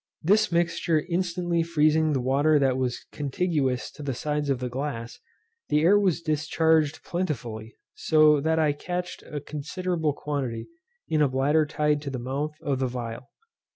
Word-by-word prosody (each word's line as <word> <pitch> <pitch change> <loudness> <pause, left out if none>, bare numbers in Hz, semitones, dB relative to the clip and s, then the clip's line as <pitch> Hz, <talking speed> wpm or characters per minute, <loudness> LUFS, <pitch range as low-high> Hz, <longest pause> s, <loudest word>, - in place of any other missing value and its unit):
This 210 +5 +3
mixture 170 -2 +1
instantly 175 -1 0
freezing 155 -1 +2
the 135 - +1
water 140 +5 +3
that 135 -2 +2
was 130 -1 -2
contiguous 140 -3 -1
to - - -12
the 135 -3 -3
sides 150 +2 -2
of 135 - +2
the 125 +1 -3
glass, 125 -2 -5 0.5
the 150 - +3
air 195 +6 +5
was 180 -4 +1
discharged 155 0 +1
plentifully, 120 -11 -4 0.2
so 155 -2 +4
that 160 +2 +1
I 155 -2 +3
catched 175 +4 -5
a 150 - -6
considerable 160 +2 -2
quantity, 135 -6 -4 0.4
in 155 -1 +1
a 145 - +5
bladder 145 +4 +2
tied 150 -1 +1
to 145 - -5
the 130 - -4
mouth 140 +5 -3
of 140 -4 -1
the 130 -1 0
phial. 120 0 -6
150 Hz, 160 wpm, -26 LUFS, 135-160 Hz, 0.5 s, air